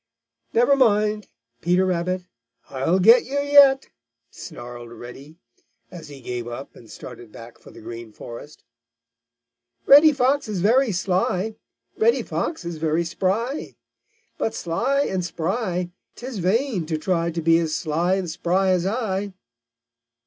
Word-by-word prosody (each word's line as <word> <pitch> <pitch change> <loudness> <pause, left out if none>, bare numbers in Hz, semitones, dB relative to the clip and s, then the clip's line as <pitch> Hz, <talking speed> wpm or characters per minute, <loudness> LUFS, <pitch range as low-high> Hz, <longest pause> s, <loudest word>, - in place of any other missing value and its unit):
"Never 245 +5 +4
mind, 210 -4 +2 0.3
Peter 180 +2 +2
Rabbit, 185 0 -1 0.5
I'll 135 +7 +1
get 225 +6 +6
you 280 +3 -2
yet!" 285 -1 +5 0.4
snarled 120 -1 -10
Reddy, 135 +6 -11 0.5
as 165 -3 -10
he 140 -2 -11
gave 120 -1 -5
up 120 +3 -8
and 115 - -16
started 120 -3 -11
back 115 +2 -12
for - - -16
the - - -14
Green 115 0 -9
Forest. 120 +7 -11 1.2
"Reddy 295 +3 +8
Fox 275 0 +1
is 210 -4 -3
very 235 +6 +3
sly! 185 +3 -1 0.5
Reddy 460 +2 +3
Fox 320 - -4
is 170 -1 -5
very 160 +1 0
spry! 200 - -2 0.6
But 225 - -1
sly 240 +12 0
and 190 -9 -1
spry, 180 +1 -2 0.2
'tis 245 -3 -7
vain 195 - 0
to 160 -1 -1
try 170 +1 0
To 170 0 -4
be 165 0 +4
as 160 -2 -1
sly 170 +4 0
and 190 -2 -3
spry 185 +4 0
as 180 0 +1
I." 200 -3 -2
185 Hz, 140 wpm, -23 LUFS, 160-230 Hz, 1.2 s, Reddy